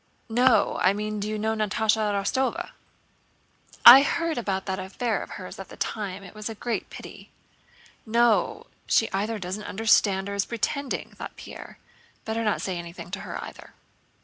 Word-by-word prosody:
"No; 245 +1 +3
I 185 - +4
mean 210 +1 -3
do 205 +1 -3
you 215 - -2
know 220 +1 0
Natásha 215 0 +1
Rostóva?" 205 +7 -1 1.1
"I 255 +3 +13
heard 335 +2 0
about 190 -4 -2
that 190 -1 -3
affair 210 +4 -2
of - - -8
hers 185 0 -9
at 195 - -8
the - - -12
time. 200 -3 -4
It 180 - -12
was 215 +1 -6
a 225 - -6
great 235 +2 -3
pity." - - -11 0.7
"No, 235 0 +2 0.2
she 225 - +2
either 210 +3 -1
doesn't 190 +1 -5
understand 200 -2 +2
or 200 - -4
is 200 0 0
pretending," 265 +4 -3
thought - - -9
Pierre. - - -10 0.5
"Better 225 +1 -2
not 210 -2 0
say 185 -2 -2
anything 170 +1 -9
to 200 - -4
her - - -6
either." - - -11
215 Hz, 170 wpm, -26 LUFS, 195-230 Hz, 1.1 s, I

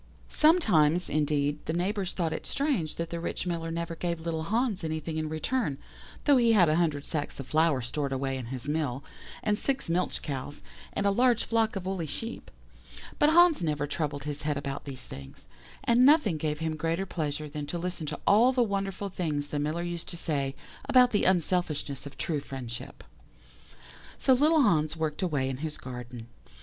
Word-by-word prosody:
"Sometimes, 180 - +4
indeed, 150 -1 0
the 160 - 0
neighbours 190 +2 -1
thought 165 -3 -1
it - - -5
strange 270 - -1
that 170 0 -4
the 170 - -3
rich 170 - -3
Miller 165 -2 -2
never 170 0 -3
gave 170 0 -2
little 160 -1 -3
Hans 220 -1 0
anything 160 0 -3
in 155 -1 -2
return, 155 - -1 0.5
though 285 -2 +6
he 235 -2 +4
had 185 -6 +6
a 155 - +3
hundred 155 -5 0
sacks 150 -3 -3
of 135 - -5
flour 155 -3 +2
stored 140 +4 -2
away 135 0 -1
in 130 -3 -5
his 130 +2 -5
mill, 145 -3 -1 0.4
and 210 -1 +1
six 275 -10 -1
milch 180 +2 0
cows, 140 0 -5 0.3
and 200 - -1
a 200 - +4
large 240 +2 +3
flock 225 -1 +1
of 190 -2 -4
woolly 185 -4 -2
sheep; 225 +11 -6 0.7
but 295 - +5
Hans 345 - +6
never 150 -3 0
troubled 145 -1 -3
his 145 0 -4
head 150 -1 -1
about 140 0 -4
these 135 -3 -6
things, 70 -1 -10 0.4
and 240 +1 +4
nothing 265 - +5
gave 150 0 -1
him 160 0 -2
greater 165 +4 -1
pleasure 155 -4 -3
than 145 0 -6
to 175 - -3
listen 170 -2 -4
to 150 - -4
all 230 +5 +6
the 250 -2 +3
wonderful 200 -1 -2
things 150 -6 -2
the 145 - -2
Miller 155 +4 -1
used 170 -1 -4
to 170 - -4
say 140 -5 -1 0.3
about 250 -1 +6
the 205 - +2
unselfishness 165 -6 0
of 140 - -11
true 155 -3 -1
friendship. 130 -4 -7 1.1
"So 265 - +4
little 300 +3 +4
Hans 155 - +2
worked 155 0 -2
away 145 -8 0
in 130 -1 -3
his 155 +2 -4
garden. 125 -2 -8
160 Hz, 190 wpm, -28 LUFS, 145-195 Hz, 1.1 s, though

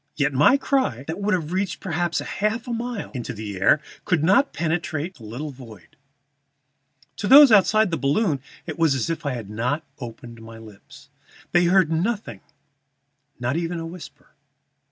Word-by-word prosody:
Yet 140 -1 0
my 150 - +5
cry, 265 - 0
that 160 +5 -5
would 205 -1 +2
have 165 -3 -4
reached 190 0 -2
perhaps 175 -2 -2
half 220 +5 -2
a 240 - -3
mile 235 -2 -4
in 125 -3 -5 0.4
air, 145 - +5 0.2
could 165 -4 0
not 225 - +4
penetrate 165 0 -2
that 120 - -15
little 125 +8 -6
void. 115 -8 -14 1.2
To 205 - -3
those 280 +1 +9
outside 215 0 +4
the 165 - 0
balloon 145 - +1 0.2
it - - -7
was 160 -4 +3
as 130 +5 -1
if 165 -2 -4
I 140 - -1
had 110 -5 -7
not 125 +8 -2 0.2
opened 120 -1 -9
my 115 0 -11
lips. 110 -3 -15 0.4
They 175 0 +4
heard 180 -2 +3
nothing, 175 - -2 1.0
not 125 +3 -1
even 170 0 -3
a 165 - -5
whisper. 170 +1 -11
165 Hz, 165 wpm, -23 LUFS, 130-195 Hz, 1.2 s, those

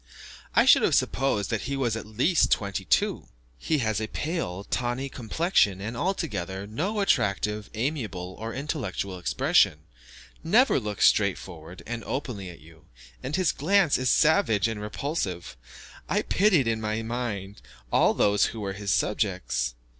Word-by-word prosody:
I - - +5
should - - +7
have - - +3
supposed 110 -7 0
that 115 - -2
he 140 - -2
was 120 -5 0
at 110 -1 -6
least 150 - +2
twenty 100 -2 -1
two. - - +1 0.3
He 155 - 0
has 110 0 0
a 110 - -2
pale, 150 - -3
tawny 120 +5 -2
complexion, 120 - +1
and, 110 +4 -5
altogether, 100 - -3
no 185 - -2
attractive, 105 - 0
amiable, 110 - -3
or 115 +1 -4
intellectual 115 - -4
expression; 90 - +2 0.6
never 225 - +4
looks 105 -3 0
straightforward 90 -4 0
and 120 0 -5
openly 120 -9 -4
at 85 -6 -12
you, 80 +1 -18 0.4
and 140 - -3
his 185 -3 +2
glance 180 0 +2
is 130 -1 +1
savage 150 - +3
and 110 -2 -4
repulsive. 105 - -4 0.5
I - - +1
pitied, 185 - +3
in 110 -1 0
my 110 +1 -2
mind, 110 -4 -4 0.3
all - - +4
those 105 0 +3
who 115 - -5
were 100 -2 -3
his 100 0 -5
subjects. 65 -8 0
110 Hz, 150 wpm, -26 LUFS, 100-140 Hz, 0.6 s, should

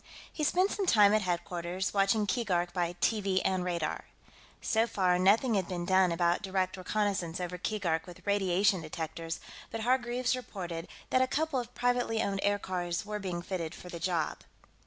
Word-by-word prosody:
He 305 - -3
spent 365 +6 +3
some 395 -2 -1
time 210 -6 +6
at 215 - +4
headquarters, 175 0 -2
watching 200 +2 +3
Keegark 185 -6 0
by 175 -2 0
TV 200 -4 +2
and 185 -1 +1
radar. 170 -3 -2 0.5
So 225 +1 +1
far, 185 -5 +2
nothing 215 +6 +4
had 190 -4 +1
been 175 -2 -3
done 185 -1 +4
about 170 +1 +2
direct 190 -2 -1
reconnaissance 185 -3 -1
over 180 0 -4
Keegark 175 -6 -1
with 175 - -12
radiation 195 -1 +2
detectors, 160 +1 -5 0.3
but 225 - -4
Hargreaves 245 +1 +1
reported 180 -9 -6 0.2
that 255 - +4
a 260 - +3
couple 305 0 0
of 245 0 -7
privately 245 -2 +1
owned 200 -2 0
aircars 185 -3 -1
were 210 0 -4
being 180 -3 -4
fitted 175 -3 -4
for 180 - -10
the 170 - -6
job. 170 -1 -1
190 Hz, 170 wpm, -31 LUFS, 175-220 Hz, 0.5 s, time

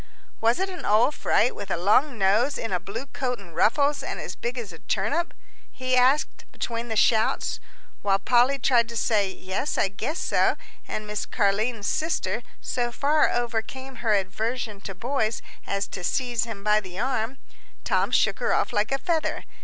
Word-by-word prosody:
"Was 230 +2 +3
it 380 - +1
an 365 -3 -7
old 225 +7 +4
fright - - +2
with 200 - -7
a 175 - 0
long 230 - +3
nose 215 +8 +3
in 225 -4 -3
a 180 - +1
blue 215 +8 -6
coat 255 -2 -3
and 175 -5 -14
ruffles, 285 - +3
and - - -4
as - - -6
big 240 +2 -4
as 215 -7 -5
a 165 - -11
turnip?" 255 - -1 0.4
he 255 0 -1
asked 260 +4 +2
between 235 0 -4
the 220 - -3
shouts. 220 +1 +2 0.4
While 195 -1 +3
Polly 245 +7 +3
tried 240 -3 +3
to 235 - -4
say, 210 -3 +2
"Yes, 190 +10 -3
I 195 - +2
guess 230 - -3
so," - - +2 0.3
and 215 - -4
Miss 210 0 -3
Car'line's 210 +1 0
sister 240 - 0 0.2
so 240 -1 -1
far 295 +5 +3
overcame 240 +3 -3
her 220 -3 +2
aversion 210 +2 -2
to 195 - -5
boys 230 +1 -1 0.2
as 200 0 -1
to 185 - -6
seize 240 +3 0
him 220 -4 -7
by 210 0 +4
the 185 -3 -9
arm, 250 +1 -1 0.5
Tom - - +1
shook - - +2
her - - +1
off - - 0
like 210 +3 +1
a 270 - +2
feather. 320 +2 -1
230 Hz, 185 wpm, -25 LUFS, 205-260 Hz, 0.5 s, old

